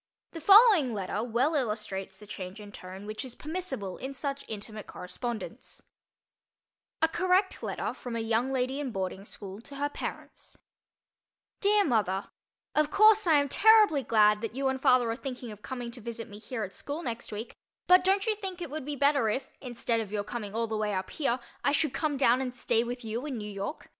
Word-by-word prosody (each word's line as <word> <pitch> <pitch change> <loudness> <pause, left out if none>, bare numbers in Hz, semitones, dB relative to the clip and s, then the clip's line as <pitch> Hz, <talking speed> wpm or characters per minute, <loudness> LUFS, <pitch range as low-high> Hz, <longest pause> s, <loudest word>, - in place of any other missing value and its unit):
The 330 - -8
following 390 - +7
letter 195 0 -2
well 245 +6 +1
illustrates 210 -7 -2
the 210 - -13
change 190 -1 -7
in 205 -1 -10
tone 190 +1 -9
which 215 +4 -5
is 255 -2 -8
permissible 305 - -4
in 270 +1 -6
such 280 0 -3
intimate 215 0 -6
correspondence: 220 +6 -6 1.2
A - - +7
Correct 370 +3 +1
Letter - - -3
from 245 -2 -6
a - - -1
Young 225 +3 +1
Lady 260 +1 -1
in 285 -3 -2
Boarding 190 -2 -4
School 200 0 -9
to 280 +4 -12
Her 285 +1 -1
Parents - - -7 1.0
DEAR 410 0 +4
MOTHER: 205 -7 0 0.4
Of 305 0 +3
course 430 0 +6
I 325 - +6
am 285 -1 +4
terribly 425 -3 +6
glad 210 -3 +4
that 225 0 -4
you 270 0 +1
and 265 0 -2
father 250 -3 +4
are - - -2
thinking 250 -2 -6
of 210 -1 -11
coming 245 -1 -5
to 240 0 -8
visit 230 +1 -6
me 205 -2 -11
here 230 0 -4
at 195 - -6
school 295 +4 -5
next 235 -3 -5
week, 215 +3 -6 0.3
but 360 0 +6
don't 390 +1 +2
you 445 - +2
think 385 -3 -6
it 340 -5 -6
would 305 -2 -5
be 295 0 -3
better 280 -4 +3
if, 260 +5 -3
instead 240 -2 -1
of 215 -3 -5
your 210 -1 -1
coming 210 -1 -6
all 230 0 +1
the 220 -1 -3
way 210 -1 -1
up 185 0 -3
here, 260 -5 0 0.2
I 285 - +3
should 300 -2 +1
come 300 -3 -1
down 255 -1 +4
and 250 -1 -4
stay 235 -2 +1
with 245 0 -5
you 225 +3 -3
in 265 -4 -3
New 210 -1 -5
York? 200 +8 -5
245 Hz, 205 wpm, -29 LUFS, 215-290 Hz, 1.2 s, following